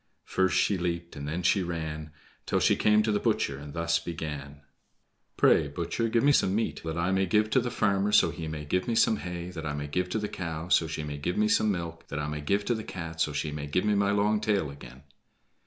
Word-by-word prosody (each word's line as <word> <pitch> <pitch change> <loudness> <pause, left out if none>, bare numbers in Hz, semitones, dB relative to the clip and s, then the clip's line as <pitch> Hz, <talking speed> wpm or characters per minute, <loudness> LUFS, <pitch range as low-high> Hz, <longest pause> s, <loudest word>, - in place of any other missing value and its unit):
First 95 0 +1
she 100 0 +2
leaped, 85 -1 -3
and 70 0 -6
then 85 +4 -3
she 95 +3 +3
ran, 80 -3 -4 0.4
Till - - +2
she - - +4
came 105 0 +4
to 110 - +1
the 105 - +1
butcher, 70 -7 0
and 70 0 -9
thus 85 0 +1
began: 75 -4 -6 0.8
"Pray - - +5
butcher, 85 +10 -2
give 115 +2 +2
me 145 - +6
some 95 -8 +3
meat 115 - -1
that 80 0 -4
I 85 +2 +1
may 95 0 +2
give 105 +3 +2
to 130 - +4
the 120 0 -2
farmer, 100 -2 +1
so - - +5
he 80 - -6
may 75 -1 -5
give 90 +5 0
me 115 - 0
some 110 -1 +4
hay 90 -1 -5
that 80 -3 -7
I 75 -2 -3
may 75 0 -4
give 90 +5 -2
to - - -1
the 105 -1 -2
cow, 85 -3 -5
so 85 -2 +4
she 80 0 -4
may 75 -1 -5
give 90 +5 -2
me 105 0 +3
some 110 0 +3
milk 85 -3 -5
that - - -5
I 75 - -2
may 75 0 -4
give 100 +7 0
to 120 - +1
the 110 -1 -4
Cat, 85 -4 -6
so 75 - +2
she 75 +1 -2
may 75 -1 -5
give 90 +7 0
me 105 - +3
my 100 0 +2
long 105 +1 +2
tail 100 -9 0
again." 70 0 -12
85 Hz, 255 wpm, -28 LUFS, 75-105 Hz, 0.8 s, me